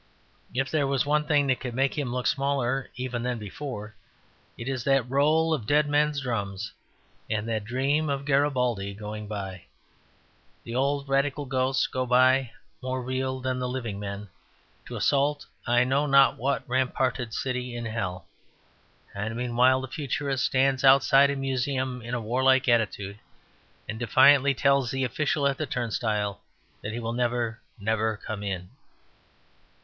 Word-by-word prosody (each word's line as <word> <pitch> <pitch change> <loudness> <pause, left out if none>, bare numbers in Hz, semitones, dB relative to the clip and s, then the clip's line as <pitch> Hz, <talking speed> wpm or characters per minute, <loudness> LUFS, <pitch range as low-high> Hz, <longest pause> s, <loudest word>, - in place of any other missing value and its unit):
If 135 0 0
there 145 -3 +1
was 135 -1 +1
one 150 +1 +1
thing 150 -2 +3
that 130 -2 +1
could 125 -2 -5
make 135 +1 +1
him 140 -5 -2
look 125 0 -2
smaller 135 -2 0
even 125 -1 -3
than 125 0 -2
before 105 0 -7 0.6
it 115 - -7
is 130 -3 -2
that 135 -2 +2
roll 155 +5 +3
of 120 -9 -3
dead 150 +2 +3
men's 145 0 +1
drums 105 -5 -3 0.6
and 110 0 -1
that 110 -2 -2
dream 140 +6 0
of 140 0 -2
Garibaldi 125 -8 +1
going 105 0 -7
by. 95 -4 -6 1.0
The 115 - -7
old 140 +2 0
Radical 140 +1 0
ghosts 130 0 +1
go 130 0 -2
by, 130 +1 +4 0.3
more 130 0 -3
real 130 +1 -2
than 130 0 -2
the 125 0 -2
living 115 -6 -4
men, 100 0 -6 0.6
to - - -7
assault 145 +1 +1 0.2
I 120 +1 +4
know 135 +4 +1
not 140 -1 +5
what 140 +4 -2
ramparted 125 -2 0
city 125 0 -3
in 120 -1 -4
hell. 95 -6 -4 0.9
And 105 +3 -4
meanwhile 125 +2 +3
the 130 - -5
Futurist 140 -1 -2
stands 135 0 +2
outside 135 +1 +6
a 140 - -1
museum 130 -1 -2
in 120 +2 -4
a - - -1
warlike 130 +4 +2
attitude, 105 -4 0 0.7
and 110 +1 -5
defiantly 135 +4 +5
tells 140 -2 +2
the 135 0 -1
official 140 +3 0
at 140 -1 -1
the 155 - -2
turnstile 110 -4 -2 0.4
that 105 - -4
he 115 - -4
will 115 0 -3
never, 120 -2 -1 0.2
never 110 +1 0
come 105 0 -6
in. 95 -3 -4
130 Hz, 155 wpm, -26 LUFS, 115-135 Hz, 1.0 s, outside